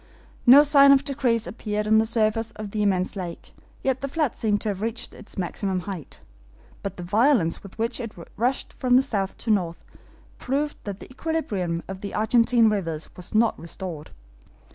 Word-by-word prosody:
No 275 +4 +10
sign 280 -1 +7
of 275 0 +5
decrease 255 -5 0
appeared 210 +2 -3
on 220 0 +5
the 220 - +2
surface 225 0 +1
of 215 -2 -7
the 215 - -2
immense 190 -2 +1
lake, 180 -3 -7 0.3
yet 265 -1 0
the 275 - -2
flood 295 -2 -1
seemed 210 -2 0
to 220 - -1
have 195 -1 -3
reached 225 +2 -4
its 215 - -11
maximum 190 0 -2
height; 180 -5 -8 0.6
but 195 -1 -5
the 175 - -6
violence 210 - +2
with 200 - -13
which 230 +3 -1
it 230 -3 -6 0.2
rushed 250 +4 -1
from 250 -1 +2
the 260 - +6
south 200 -7 -2
to 230 - -2
north 175 -5 -1 0.5
proved 290 +3 -1
that 200 -1 -6
the - - -11
equilibrium 205 - -2
of 190 0 -7
the 200 - -5
Argentine 230 +1 +4
rivers 165 -7 -2
was 180 +3 -8
not 225 +1 +3
restored. 170 -1 -7
215 Hz, 185 wpm, -25 LUFS, 190-250 Hz, 0.6 s, No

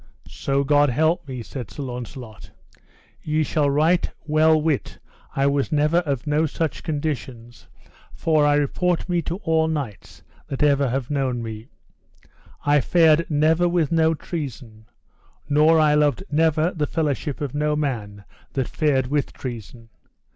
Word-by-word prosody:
So 140 0 -1
God 145 0 +3
me 120 - -3
help, 160 0 +1
said 125 -1 -7
Sir 145 - -7
Launcelot, 125 -3 -8 0.7
ye 155 0 0
shall 150 -1 +1
right 155 +5 +2 0.2
well 155 +1 +4
wit 155 -3 -1 0.4
I 135 - +1
was 140 +1 +1
never 150 +2 +2
of 145 -6 -1
no 150 +2 +1
such 155 -1 -3
conditions, 130 - -5 0.4
for 155 -2 +1
I 145 0 +4
report 170 +5 0
me 175 -2 0
to 165 +2 -4
all 160 0 +2
knights 140 -11 -5 0.2
that 135 - -2
ever 140 -2 +3
have 130 +2 -3
known 130 -4 -1
me, 110 +1 -7 1.0
I 145 0 +4
fared 165 +2 +3
never 160 +3 +2
with 170 -4 0
no 160 -1 +3
treason, 125 -10 -7 0.6
nor 155 +3 +4
I 155 -1 +4
loved 150 0 +2
never 160 +2 +2
the 150 -5 -2
fellowship 150 -2 -2
of 145 -4 -4
no 150 +1 0
man 110 -9 -3 0.3
that 130 -3 -1
fared 140 -5 +1
with 145 +2 -1
treason. 115 -2 -8
145 Hz, 145 wpm, -23 LUFS, 135-160 Hz, 1.0 s, well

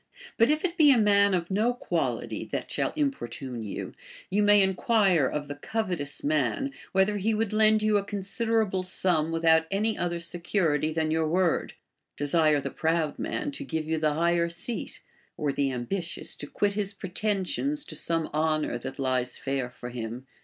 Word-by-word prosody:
But 230 - +4
if 305 +3 +2
it 345 -1 -2
be 305 -2 +7
a 260 - +5
man 200 -2 +4
of 175 +1 -3
no 220 +5 +2
quality - - -2
that - - -4
shall - - 0
importune 135 - -3
you, 105 -3 -5 0.4
you 205 +2 +2
may 205 -1 +6
enquire 190 - +3
of 145 +1 -3
the 145 - -4
covetous 175 -2 -3
man, 155 - 0 0.2
whether 190 +2 +2
he 215 +3 0
would 215 -1 -1
lend 215 0 +4
you 215 -1 +3
a - - -4
considerable 205 0 -1
sum 175 -3 0
without 160 0 +3
any 215 +3 0
other 175 0 -2
secu 175 +3 -1
rity 150 +1 +1
than 160 0 0
your 160 0 +1
word; 175 +1 +1 0.4
desire 150 +1 +3
the - - -4
proud 160 -2 0
man 290 - -2
to 280 - -6
give 160 - -3
you 160 0 0
the 155 -1 +1
higher 170 +1 +2
seat; 180 +6 -5 0.4
or 145 -2 0
the 140 -1 0
ambitious, 165 +9 -3
to 145 - -6
quit 205 +5 0
his 200 -1 -1
ju 200 - -9
etensions 215 +10 -1
to - - -6
some 165 -2 0
honor 155 -4 0
that 130 +2 -7
lies 130 -2 -1
fair 135 -2 -2
for 125 0 -9
him. 120 +1 -6
175 Hz, 180 wpm, -27 LUFS, 150-210 Hz, 0.4 s, be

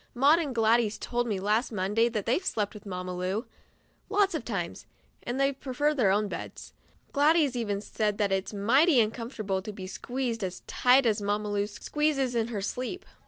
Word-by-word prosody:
Maud 285 +6 +5
and 285 -7 -3
Gladys 225 -1 +3
told 240 0 -2
me 205 -4 -1
last 215 +6 +1
Monday 210 +3 +1
that 215 -4 -3
they've 255 +11 +1
slept 210 - -1
with 210 -1 -11
Mamma 180 -1 -4
Lu 185 +6 -2 0.6
lots 400 -1 +2
of - - -2
times, - - -4 0.3
and 245 +2 -4
that - - +4
they 275 - +3
prefer 275 +3 -1
their 245 -9 +2
own 205 +2 +2
beds. - - -7 0.4
Gladys 295 -2 +3
even 205 -4 -2
said 210 -1 -1
that 205 -2 +1
it's 190 0 -1
mighty 255 - +4
uncomfortable 215 -3 -1
to 215 +2 -6
be 195 -2 -8
squeezed 235 +3 -3
as 185 -1 -5
tight 255 +1 +4
as 215 -2 +2
Mamma 205 +1 -1
Lu 205 0 0
squeezes 275 +4 -1
in 230 -1 0
her 220 -4 -4
sleep. 255 - -4
225 Hz, 190 wpm, -28 LUFS, 205-260 Hz, 0.6 s, Maud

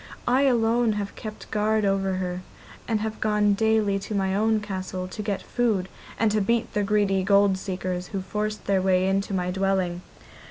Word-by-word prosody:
I 260 +3 +4
alone 235 -2 +3
have 205 -1 -4
kept 215 -1 -9
guard 215 0 +1
over 195 -1 +1
her, 180 -1 -3 0.5
and 220 -2 0
have 220 0 -4
gone 210 -1 +3
daily 215 -1 +2
to 205 +2 -5
my 190 -1 0
own 220 +2 +2
castle 185 -2 -5
to 210 +4 -6
get 205 -2 -3
food 215 -7 0 0.3
and 225 -1 +2
to 215 0 +1
beat 230 +3 0
the 210 - +1
greedy 200 -1 +2
gold 200 0 +4
seekers 185 -1 -4
who 195 -2 -4
forced 210 +2 -3
their 195 -1 +2
way 185 0 +2
into 195 +1 0
my 180 -2 -1
dwelling. 190 -2 0
200 Hz, 185 wpm, -25 LUFS, 190-215 Hz, 0.5 s, I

